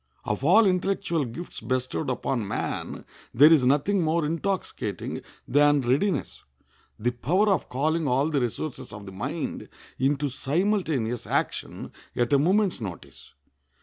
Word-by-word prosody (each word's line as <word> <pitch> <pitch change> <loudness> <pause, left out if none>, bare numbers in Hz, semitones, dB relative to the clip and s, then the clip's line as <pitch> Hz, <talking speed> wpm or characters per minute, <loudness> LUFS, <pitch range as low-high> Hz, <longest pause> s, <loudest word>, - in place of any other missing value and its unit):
Of 105 +5 -2
all 200 +9 +6
intellectual 185 -4 0
gifts 155 +10 -7
bestowed 130 +5 -2
upon 125 -3 -1
man - - -4 0.3
there 150 +6 +8
is 150 -5 +4
nothing 145 +10 +2
more 160 0 +1
intoxicating 165 - -3 0.3
than 145 0 +4
readiness—the 130 - -3
power 170 - +1
of 190 -6 +1
calling 155 +4 0
all 135 +5 +2
the 140 -3 +1
resources 125 +4 -4
of 105 -1 -9
the 95 - -8
mind 140 - -4 0.3
into 140 +2 +1
simultaneous 140 - -1
action - - -2 0.2
at 120 +2 +1
a 140 - +6
moment's 185 - +2
notice. 70 -9 -9
145 Hz, 130 wpm, -26 LUFS, 125-170 Hz, 0.3 s, there